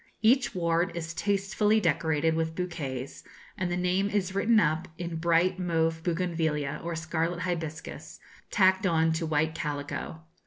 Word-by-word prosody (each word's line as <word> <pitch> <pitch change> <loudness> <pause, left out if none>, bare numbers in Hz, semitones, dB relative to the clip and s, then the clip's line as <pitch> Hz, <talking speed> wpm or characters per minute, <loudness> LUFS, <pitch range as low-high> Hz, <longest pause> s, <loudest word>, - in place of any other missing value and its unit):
Each 240 0 +4
ward 170 +1 +1
is 165 0 -4
tastefully 205 +3 +1
decorated 160 -3 +1
with 160 0 -1
bouquets, 145 -8 -4 0.3
and 185 -1 -2
the 175 - 0
name 180 +2 +1
is 195 -3 -1
written 215 +3 +4
up 155 -2 +1
in 170 -2 -4
bright 170 +3 +2
mauve 165 -2 0
bougainvillea 165 -4 -1
or 170 0 -3
scarlet 165 +1 -2
hibiscus, 165 -3 -5 0.3
tacked 190 -1 +3
on 165 -1 +3
to 160 0 -2
white 155 +1 +1
calico. 150 +2 -4
170 Hz, 145 wpm, -28 LUFS, 160-185 Hz, 0.3 s, Each